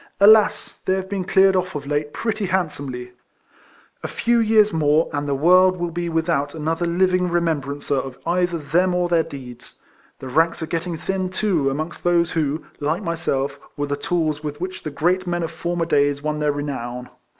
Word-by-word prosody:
Alas! 215 +2 +5
they 185 - +1
have 190 0 -3
been 195 -1 -2
cleared 190 +1 +4
off 185 -2 -1
of 145 -1 -4
late 145 +1 -1
])retty 215 -3 0
handsomely! 140 -9 -3 0.9
A - - -4
few 235 0 +1
years 215 -2 +4
more, 155 0 +3
and 145 0 -2
the 140 - +1
world 185 +5 +5
will 175 -1 -3
be 170 +1 -3
without 160 -3 0
another 160 +2 -1
living 180 +1 +2
remembrancer 145 -5 -1
of 130 -1 -4
either 175 0 +1
them 175 +5 +1
or 180 0 +1
their 170 -1 +3
deeds. 130 -6 -10 0.4
The 130 - -8
ranks 165 +6 +2
are - - -1
getting 165 +1 -3
thin, 190 +2 -2
too, 185 -7 +1
amongst 155 +5 -4
those 170 -1 +2
who, 155 -1 -1
like 155 +7 -1
myself, 140 -5 -2 0.2
were 145 - -1
the 145 0 -2
tools 155 0 -1
with 150 -1 -5
which 185 +1 -5
the 155 - -4
great 175 +6 0
men 175 -1 -1
of 165 - -3
former 170 0 -2
days 145 -2 +1
won 150 0 -2
their 150 -1 +1
renown. 125 -4 -5
165 Hz, 185 wpm, -22 LUFS, 145-180 Hz, 0.9 s, Alas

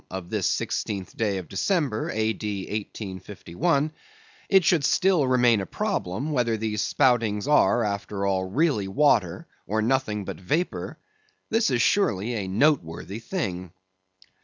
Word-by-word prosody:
of 90 -2 -7
this - - 0
sixteenth 95 -3 -2
day 105 -3 0
of 90 -3 -6
December, 135 - -1
A.D. 110 -2 -2
1851), 105 - -3 0.6
it 190 -2 +5
should 170 -4 +3
still 180 -3 +3
remain 120 -4 +4
a - - -4
problem, 110 - -2
whether 120 -5 +1
these 110 -1 -2
spoutings 115 -4 +1
are, 145 -5 +4
after 100 -1 -3
all, 95 -1 0
really 110 - +1
water, 100 - +2 0.2
or 110 +3 0
nothing 110 -3 0
but - - -6
vapor—this 230 - -3
is 120 -3 +2
surely 120 - +1
a 100 -5 -3
noteworthy 100 - 0
thing. 95 - -4
110 Hz, 130 wpm, -25 LUFS, 100-145 Hz, 0.6 s, it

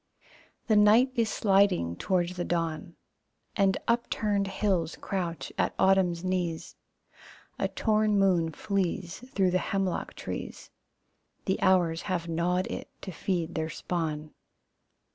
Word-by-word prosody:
The 220 - +3
night 215 +5 +6
is 230 -3 +1
sliding 195 - +2
towards 180 - 0
the 175 - -2
dawn, 165 -1 -2 0.6
And 195 -2 +3
upturned 210 -4 0
hills 190 -4 0
crouch 175 -4 -4
at - - +1
autumn's 190 -3 +3
knees. 180 -3 -2 0.8
A - - +1
torn 215 -1 +1
moon 180 -4 +3
flees 190 0 -2
Through 190 -7 +1
the 185 - +2
hemlock 195 -2 -2
trees, - - -7 0.7
The 190 - 0
hours 175 -3 +3
have 175 -2 -1
gnawed 175 +3 0
it - - -6
to 190 - -5
feed 175 -1 -2
their 160 0 -2
spawn. 155 -3 -3
185 Hz, 125 wpm, -28 LUFS, 170-200 Hz, 0.8 s, night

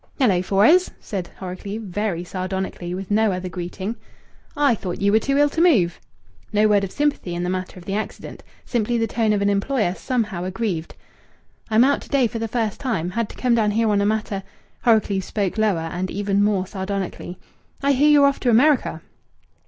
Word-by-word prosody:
"Hello, 205 -10 +3
Fores!" 215 - +4
said 185 -4 -5
Horrocleave 195 +4 -6
very 195 -2 -2
sardonically, 185 -1 -4
with 195 +1 -6
no 215 0 +3
other 185 0 -4
greeting. 185 +5 -5 0.6
"I 285 -4 +4
thought 185 -5 -4
ye 200 0 +2
were 220 - +5
too 275 +4 0
ill 290 0 +4
to 325 - -1
move." 210 - +3 0.5
No 210 +1 +3
word 205 -1 +3
of 190 - -4
sympathy 290 -12 -1
in 175 - -2
the 180 - -1
matter 185 0 -4
of 175 - -12
the 195 - -3
accident! 215 +2 -5 0.2
Simply 240 0 0
the 225 - +1
tone 225 -1 0
of 205 -1 +1
an 200 - +2
employer 200 -1 0
somehow 215 -6 -2
aggrieved! 185 -3 -3 0.7
"I'm 220 +2 +5
out 280 +2 +2
to - - -13
day 275 -3 +3
for 230 0 -3
the 225 - -2
first 220 -2 -2
time. 180 -10 -2
Had 230 +2 -2
to - - -12
come 250 -2 +1
down 220 -2 +3
here 220 +1 +1
on 200 -1 +2
a 200 - +2
matter 215 -2 -1 0.2
" - - -38
Horrocleave 215 -4 +3
spoke 200 +2 -2
lower, 170 -7 +1
and 185 +1 -2
even 200 0 0
more 200 -3 +1
sardonically. 190 -2 -5 0.5
"I 280 - +4
hear 285 +2 +4
ye're 290 -1 +6
off 280 0 +2
to 250 - +1
America." 265 +5 +3
205 Hz, 200 wpm, -22 LUFS, 185-230 Hz, 0.7 s, ye're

